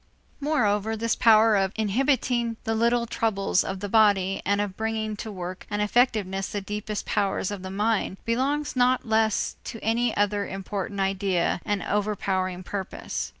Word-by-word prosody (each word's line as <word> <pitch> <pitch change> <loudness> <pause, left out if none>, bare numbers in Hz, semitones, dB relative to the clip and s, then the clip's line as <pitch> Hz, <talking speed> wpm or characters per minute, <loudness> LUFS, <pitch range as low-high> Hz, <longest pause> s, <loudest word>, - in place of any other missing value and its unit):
Moreover 220 -7 +1
this 230 0 0
power 220 -1 +5
of 195 0 +1
inhibiting 235 +1 +1
the 225 - -1
little 235 +1 +2
troubles 210 -5 +1
of 190 0 -5
the 205 - -3
body 200 -3 +3
and 200 +1 +1
of 205 -2 -2
bringing 220 0 -2
to 220 +1 -6
work 185 -1 -7
and 205 - -2
effectiveness 210 -3 +1
the 205 - -3
deepest 210 +1 -4
powers 200 -1 0
of 200 -2 -5
the 190 - -6
mind 205 0 0
belongs 275 +6 0
not 250 0 +2
less 220 -1 +1
to 230 - -6
any 230 +1 +1
other 205 0 +1
important 195 +1 -4
idea 190 -3 0
and 205 -3 -1
overpowering 190 -3 -1
purpose. 195 +1 -4
210 Hz, 155 wpm, -26 LUFS, 195-225 Hz, -, power